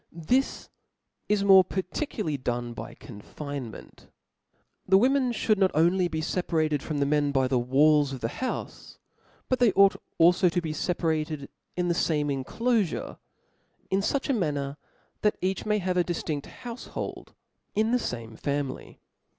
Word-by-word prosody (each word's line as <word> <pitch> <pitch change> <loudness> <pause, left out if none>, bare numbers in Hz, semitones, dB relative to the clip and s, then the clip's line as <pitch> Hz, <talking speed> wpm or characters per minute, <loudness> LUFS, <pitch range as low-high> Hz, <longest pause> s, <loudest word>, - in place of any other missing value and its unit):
This 240 +12 -1 0.6
is 210 -1 +2
more 190 -1 +8
particularly 185 - -3
done 120 -2 -3
by - - -8
confinement. 130 +3 -9 0.8
The 190 0 +6
women 255 +3 +3
(hould 215 -3 +1
not 190 -2 +4
only 175 +3 +3
be 160 -2 -3
feparated 155 -3 0
from 155 - -4
the 140 - +2
men 145 0 +2
by 135 -2 +2
the 130 -1 +1
walls 145 +3 +4
of 135 - -5
the 115 - 0
houfe; 255 - -5 0.5
but 255 - 0
they 240 -4 +5
ought 195 0 +6 0.2
alfo 175 +2 +5
to 175 - +1
be 160 -3 -3
feparated 155 -4 -1 0.3
in 180 -1 0
the 175 - +2
fame 150 -3 0
inclofure, 200 - -1 0.7
in 190 - +3
fuch 270 +7 0
a 275 - +2
manner 145 - -1 0.4
that 210 - +2
each 190 +3 -2
may 210 0 +2
have 185 -2 -1
a 180 - +4
diftinft 160 -4 -3 0.2
houfhold 240 0 -7 0.4
in 220 +2 +2
the 250 - +3
fame 115 - -5
family. 140 0 -4
165 Hz, 150 wpm, -27 LUFS, 145-195 Hz, 0.8 s, more